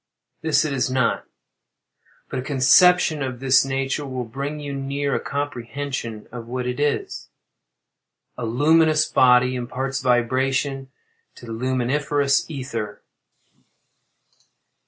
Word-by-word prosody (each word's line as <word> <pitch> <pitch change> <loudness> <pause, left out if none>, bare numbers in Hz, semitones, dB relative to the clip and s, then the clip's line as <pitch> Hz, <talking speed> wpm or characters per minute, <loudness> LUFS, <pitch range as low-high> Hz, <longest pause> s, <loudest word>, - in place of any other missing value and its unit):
This 155 -1 +2
it 150 - -2
is 130 -1 0
not; 130 -2 0 1.0
but - - -4
a - - -2
conception 150 +4 +4
of 130 -2 -4
this 130 0 +4
nature 135 +2 -2
will 130 -3 -4
bring 140 +6 -5
you 145 -1 -5
near 140 +1 -2
a - - +1
comprehension 135 -4 -5
of 115 -1 -8
what 125 +1 -3
it 125 +2 -3
is. 145 0 -2 1.1
A 120 - -4
luminous 155 +5 +3
body 125 0 +4
imparts 130 +2 -3
vibration 130 +2 0 0.5
to - - -13
the 115 - -8
luminiferous 135 +5 0
ether. 115 -8 -5
135 Hz, 115 wpm, -22 LUFS, 125-145 Hz, 1.1 s, conception